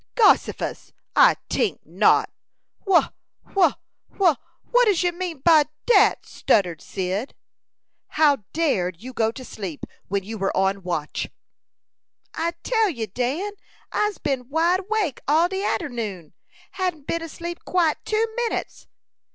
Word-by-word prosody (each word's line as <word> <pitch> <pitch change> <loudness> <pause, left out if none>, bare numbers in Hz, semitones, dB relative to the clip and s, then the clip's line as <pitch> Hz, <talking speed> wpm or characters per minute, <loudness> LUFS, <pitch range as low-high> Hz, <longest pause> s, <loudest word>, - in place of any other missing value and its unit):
"Gossifus! 435 -4 +2 0.2
I - - +7
tink - - -1
not. - - +3 0.6
Wha 375 -3 +4 0.4
wha 385 -3 +4 0.4
wha 355 -6 +4 0.4
what - - +5
does 395 -5 +2
you 355 - +2
mean 345 -5 -5
by 315 -1 +6 0.2
dat?" 420 -4 +4
stuttered 180 -6 +1
Cyd. 190 +7 -3 0.7
"How 300 -2 +3
dared 190 - 0
you 255 +1 -8
go 225 -2 +1
to 255 +2 -10
sleep 190 -11 -6 0.2
when 200 0 -1
you 220 +2 -7
were 195 - -1
on 195 +1 +1
watch?" 170 -5 -3 1.0
"I 335 +1 -1
tell 445 -4 +2
you, 235 -10 -3
Dan, 255 - -2 0.4
I'se 420 -1 0
been 265 -4 -3
wide 335 +5 +2
awake 395 - -1
all 315 +4 +4
de 385 +2 -3
arternoon. 220 - -3 0.4
Hadn't 360 -6 -3
been 335 - -2
asleep 340 +2 -7
quite 340 -4 +1
two 435 +1 +1
minutes." 480 -1 -3
310 Hz, 135 wpm, -23 LUFS, 220-370 Hz, 1.0 s, I